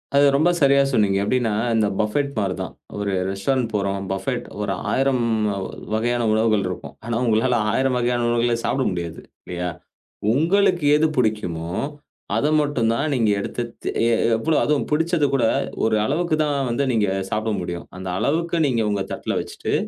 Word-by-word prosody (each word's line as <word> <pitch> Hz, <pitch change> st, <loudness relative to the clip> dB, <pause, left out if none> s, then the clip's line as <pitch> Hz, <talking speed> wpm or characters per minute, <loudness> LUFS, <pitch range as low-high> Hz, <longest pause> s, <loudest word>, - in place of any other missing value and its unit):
அது 140 Hz, 0 st, +6 dB
ரொம்ப 155 Hz, +5 st, +4 dB
சரியா 140 Hz, -2 st, +5 dB
சொன்னீங்க. 105 Hz, -6 st, +2 dB
எப்டீன்னா, 115 Hz, +1 st, +1 dB, 0.2 s
இந்த 110 Hz, -2 st, +3 dB
பஃபெட் 125 Hz, +7 st, 0 dB
மாரி 100 Hz, -3 st, 0 dB
தான். -, -, -5 dB, 0.2 s
ஒரு 100 Hz, -1 st, -2 dB, 0.2 s
ரெஸ்டாரண்ட் 115 Hz, +6 st, 0 dB
போறோம், 100 Hz, -1 st, -1 dB
பஃபெட் 120 Hz, +6 st, -2 dB, 0.2 s
ஒரு 100 Hz, -1 st, -1 dB, 0.2 s
1000 135 Hz, -2 st, +2 dB, 0.7 s
வகையான 120 Hz, +1 st, +1 dB
உணவுகள் 110 Hz, -2 st, +2 dB
இருக்கும். 70 Hz, -6 st, -6 dB
ஆனா, 120 Hz, 0 st, -2 dB
உங்களால 115 Hz, +2 st, +2 dB, 0.2 s
1000 130 Hz, +2 st, +1 dB
வகையான 120 Hz, 0 st, 0 dB
உணவுகள 120 Hz, 0 st, +2 dB
சாப்பிட 135 Hz, -, +1 dB
முடியாது 85 Hz, -2 st, -4 dB, 0.3 s
இல்லயா, 90 Hz, 0 st, -3 dB, 0.6 s
உங்களுக்கு 175 Hz, +3 st, +2 dB
எது 155 Hz, +1 st, +3 dB
பிடிக்குமோ, 90 Hz, -8 st, -1 dB, 0.6 s
அத 145 Hz, -, +2 dB
மட்டும் 130 Hz, -6 st, +1 dB
தான் 145 Hz, +6 st, -1 dB
நீங்க 115 Hz, -4 st, +2 dB
எடுத்து 120 Hz, +4 st, -3 dB, 0.2 s
தே -, -, -1 dB
எ -, -, +3 dB
எ -, -, +4 dB, 0.2 s
எவ்வளோ 155 Hz, +7 st, 0 dB
அதுவும் 150 Hz, -1 st, +1 dB
பிடிச்சத 160 Hz, 0 st, +2 dB
கூட 135 Hz, -3 st, +2 dB, 0.4 s
ஒரு 110 Hz, -1 st, +3 dB
அளவுக்கு 170 Hz, +5 st, 0 dB
தான் 145 Hz, -1 st, 0 dB
வந்து 120 Hz, +4 st, 0 dB
நீங்க 110 Hz, -4 st, +2 dB, 0.2 s
சாப்பிட 110 Hz, +1 st, -1 dB
முடியும். 85 Hz, -1 st, -5 dB
அந்த 95 Hz, 0 st, -7 dB
அளவுக்கு 170 Hz, -, 0 dB
நீங்க 125 Hz, -5 st, +1 dB
உங்க 100 Hz, -1 st, 0 dB
தட்ல -, -, -3 dB
வச்சிட்டு -, -, -5 dB
120 Hz, 165 wpm, -22 LUFS, 105-140 Hz, 0.7 s, அது